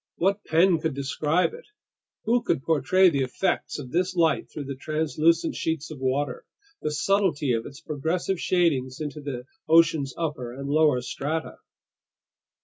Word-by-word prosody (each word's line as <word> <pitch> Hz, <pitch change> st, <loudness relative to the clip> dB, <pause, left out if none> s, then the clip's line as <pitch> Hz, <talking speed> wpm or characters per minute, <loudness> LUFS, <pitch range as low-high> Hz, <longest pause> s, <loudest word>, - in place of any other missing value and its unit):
What 200 Hz, +4 st, 0 dB
pen 170 Hz, +1 st, +4 dB
could 160 Hz, -3 st, -2 dB
describe 150 Hz, -, 0 dB
it? 480 Hz, +1 st, -11 dB, 0.6 s
Who 235 Hz, +2 st, +2 dB
could 155 Hz, -, -1 dB
portray 165 Hz, +5 st, +4 dB
the 140 Hz, -4 st, 0 dB
effects 130 Hz, +9 st, -1 dB
of 130 Hz, -4 st, -8 dB
this 180 Hz, +2 st, 0 dB
light 165 Hz, -2 st, +2 dB
through 150 Hz, -, -6 dB
these 135 Hz, -1 st, -7 dB
translucent 155 Hz, +2 st, +1 dB
sheets 160 Hz, -1 st, -3 dB
of 150 Hz, -, -8 dB
water, 130 Hz, 0 st, -1 dB, 0.4 s
the -, -, -1 dB
subtlety 150 Hz, -2 st, +1 dB
of 115 Hz, 0 st, -2 dB
its 140 Hz, +3 st, -12 dB
progressive 165 Hz, +5 st, -2 dB
shadings 140 Hz, -8 st, +1 dB
into 150 Hz, 0 st, -5 dB
the 130 Hz, -4 st, -5 dB, 0.2 s
ocean's 160 Hz, -4 st, +4 dB
upper 145 Hz, -7 st, -3 dB
and 140 Hz, +1 st, -6 dB
lower 150 Hz, -3 st, +3 dB
strata? 155 Hz, +5 st, -3 dB
155 Hz, 150 wpm, -25 LUFS, 140-170 Hz, 0.6 s, pen